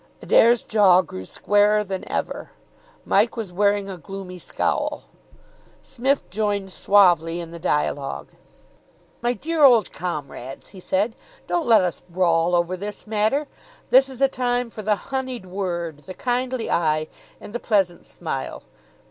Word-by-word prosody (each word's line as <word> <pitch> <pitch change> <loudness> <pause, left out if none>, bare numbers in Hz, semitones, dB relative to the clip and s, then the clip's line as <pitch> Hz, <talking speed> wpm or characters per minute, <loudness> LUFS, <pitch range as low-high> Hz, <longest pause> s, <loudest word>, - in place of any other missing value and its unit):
Adair's 235 0 +4
jaw 190 -4 +5
grew 95 - -8
squarer 205 - +2
than 190 -2 -5
ever. - - -3 0.6
Mike 220 +4 +2
was 210 -6 -5
wearing 200 +1 +2
a 190 -2 -6
gloomy 185 +2 -8
scowl. - - -2 0.8
Psmith 270 +2 -1
joined 205 -1 -1
suavely 175 -5 +3
in 170 -1 -7
the 170 - -8
dialogue. 150 -4 -1 0.9
"My 240 +1 +1
dear 320 +4 -1
old 240 -7 +6
comrades," 140 -6 -6
he 195 - -12
said, 195 +5 0 0.3
"don't 345 -5 -1
let 220 -4 +6
us 180 -2 -1
brawl 170 -1 +1
over 175 +1 +1
this 205 +3 -7
matter. 220 +7 +1 0.5
This 265 +1 +6
is 260 0 -9
a - - +7
time 245 -2 -1
for 215 - -7
the 210 0 +1 0.2
honeyed 255 -5 -3
word, 175 -4 -3
the 185 +5 -10
kindly 250 -1 -1
eye, 155 -2 +1 0.3
and 205 - -11
the 240 - -2
pleasant 195 -7 0
smile. 145 -6 -5
200 Hz, 145 wpm, -23 LUFS, 175-235 Hz, 0.9 s, a